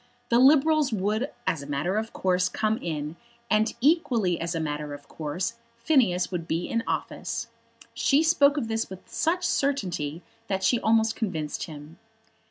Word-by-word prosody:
The 235 Hz, -, +4 dB
Liberals 300 Hz, +2 st, +5 dB
would, 215 Hz, +6 st, 0 dB, 0.2 s
as 165 Hz, -, 0 dB
a 140 Hz, -, -9 dB
matter 145 Hz, +8 st, -1 dB
of 220 Hz, +1 st, -5 dB
course, 180 Hz, -1 st, +1 dB
come 215 Hz, +3 st, 0 dB
in, 155 Hz, -1 st, -4 dB, 0.3 s
and 215 Hz, +1 st, +3 dB
equally 240 Hz, -, +2 dB
as 170 Hz, +1 st, -2 dB
a -, -, 0 dB
matter 150 Hz, -1 st, -3 dB
of 145 Hz, 0 st, -15 dB
course, 175 Hz, +9 st, -4 dB, 0.2 s
Phineas 235 Hz, -, +2 dB
would 170 Hz, -2 st, -4 dB
be 165 Hz, +1 st, -1 dB
in 230 Hz, 0 st, -1 dB
office. -, -, -3 dB, 0.4 s
She 290 Hz, +3 st, +3 dB
spoke 295 Hz, -3 st, +4 dB
of 250 Hz, -6 st, -1 dB
this 225 Hz, 0 st, -2 dB
with 190 Hz, -1 st, -10 dB
such 355 Hz, +3 st, 0 dB
certainty 180 Hz, -, -1 dB, 0.2 s
that 190 Hz, -1 st, -1 dB
she 240 Hz, -, +3 dB
almost 225 Hz, 0 st, +2 dB
convinced 160 Hz, -9 st, -3 dB
him. 155 Hz, +1 st, -11 dB
200 Hz, 165 wpm, -26 LUFS, 165-240 Hz, 0.4 s, Liberals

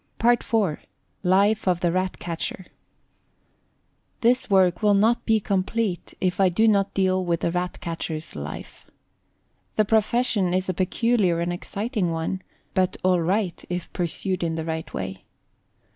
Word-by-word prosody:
PART 240 Hz, +1 st, +3 dB
IV. 205 Hz, -9 st, 0 dB, 0.4 s
LIFE 200 Hz, +3 st, +3 dB
OF 180 Hz, -1 st, +2 dB
THE 175 Hz, -, +2 dB
RAT 185 Hz, +1 st, -1 dB
CATCHER. 170 Hz, +2 st, -4 dB, 1.6 s
This 245 Hz, +1 st, +3 dB
work 185 Hz, -3 st, +4 dB
will 210 Hz, -1 st, +4 dB
not 220 Hz, +4 st, +3 dB
be 220 Hz, -1 st, +4 dB
complete 195 Hz, 0 st, -1 dB
if 185 Hz, 0 st, 0 dB
I 190 Hz, -1 st, +5 dB
do 220 Hz, +6 st, +3 dB
not 200 Hz, -2 st, +2 dB
deal 185 Hz, -1 st, +2 dB
with 170 Hz, -2 st, 0 dB
the 170 Hz, -, 0 dB
Rat 180 Hz, +1 st, -2 dB
catcher's 165 Hz, -1 st, -4 dB
life. 75 Hz, 0 st, -8 dB, 0.9 s
The 215 Hz, -, +3 dB
profession 215 Hz, -3 st, +2 dB
is 185 Hz, 0 st, 0 dB
a 185 Hz, -, 0 dB
peculiar 185 Hz, 0 st, +1 dB
and 170 Hz, +1 st, -1 dB
exciting 205 Hz, +2 st, -2 dB
one, 165 Hz, +3 st, -2 dB, 0.3 s
but 185 Hz, -1 st, +1 dB
all 180 Hz, -1 st, +3 dB
right 185 Hz, +1 st, -1 dB
if 180 Hz, -1 st, -4 dB
pursued 180 Hz, +1 st, -2 dB
in 165 Hz, -1 st, -1 dB
the 160 Hz, -1 st, -3 dB
right 160 Hz, -1 st, -4 dB
way. 95 Hz, 0 st, -5 dB
185 Hz, 150 wpm, -24 LUFS, 175-210 Hz, 1.6 s, I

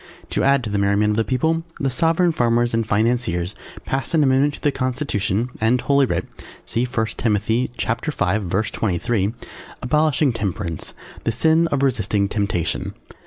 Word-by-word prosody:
To -, -, 0 dB
add 140 Hz, -1 st, +3 dB
to 110 Hz, -, -4 dB
the 100 Hz, -, 0 dB
merriment 100 Hz, +1 st, +2 dB
of 105 Hz, -, -1 dB
the 115 Hz, -, +3 dB
People, 160 Hz, +7 st, 0 dB, 0.2 s
the 135 Hz, -2 st, 0 dB
Sovereign 165 Hz, +6 st, +2 dB
Farmers 120 Hz, -4 st, +1 dB
and 115 Hz, -1 st, 0 dB
Financiers 105 Hz, -5 st, 0 dB, 0.3 s
passed 135 Hz, +5 st, -1 dB
an 155 Hz, -, +4 dB
amendment 140 Hz, +2 st, +3 dB
to -, -, -15 dB
the 145 Hz, -, +2 dB
Constitution 125 Hz, -4 st, -1 dB
and 115 Hz, +3 st, +3 dB
Holy 140 Hz, +1 st, +3 dB
Writ -, -, -1 dB, 0.4 s
(See 120 Hz, +2 st, -1 dB
I. 110 Hz, -, +1 dB
Timothy 110 Hz, +3 st, 0 dB
V. 110 Hz, -, 0 dB
23.) 100 Hz, +1 st, 0 dB, 0.5 s
abolishing 150 Hz, 0 st, +2 dB
Temperance, 95 Hz, -6 st, -4 dB, 0.3 s
the 115 Hz, -, +1 dB
sin 160 Hz, +7 st, +3 dB
of 140 Hz, -3 st, 0 dB
resisting 105 Hz, -6 st, +1 dB
temptation. 100 Hz, -5 st, -2 dB
120 Hz, 155 wpm, -21 LUFS, 105-140 Hz, 0.5 s, an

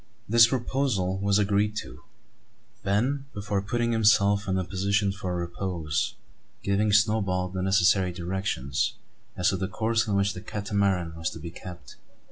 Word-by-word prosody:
This 115 Hz, +2 st, +7 dB
proposal 120 Hz, -7 st, -1 dB
was 100 Hz, 0 st, +2 dB
agreed 105 Hz, +1 st, +1 dB
to; -, -, -13 dB, 0.8 s
Ben, 125 Hz, +8 st, 0 dB
before 100 Hz, -1 st, -2 dB
putting 120 Hz, +3 st, -1 dB
himself 105 Hz, -2 st, +3 dB
in 95 Hz, -1 st, +1 dB
a 95 Hz, -, 0 dB
position 100 Hz, +2 st, 0 dB
for 95 Hz, -2 st, -4 dB
repose, 85 Hz, -3 st, -2 dB, 0.5 s
giving 100 Hz, +2 st, +1 dB
Snowball 100 Hz, -4 st, +2 dB
the 95 Hz, 0 st, -4 dB
necessary 95 Hz, -1 st, +3 dB
directions 85 Hz, -, -2 dB, 0.4 s
as 90 Hz, +2 st, +3 dB
to 95 Hz, -, -1 dB
the 95 Hz, 0 st, -2 dB
course 110 Hz, +2 st, 0 dB
in 105 Hz, -, 0 dB
which 100 Hz, 0 st, +1 dB
the 90 Hz, -, -8 dB
Catamaran 100 Hz, -5 st, -1 dB
was 80 Hz, -1 st, -2 dB
to -, -, -9 dB
be 85 Hz, +1 st, -7 dB
kept. 90 Hz, -1 st, -11 dB
100 Hz, 150 wpm, -27 LUFS, 90-105 Hz, 0.8 s, This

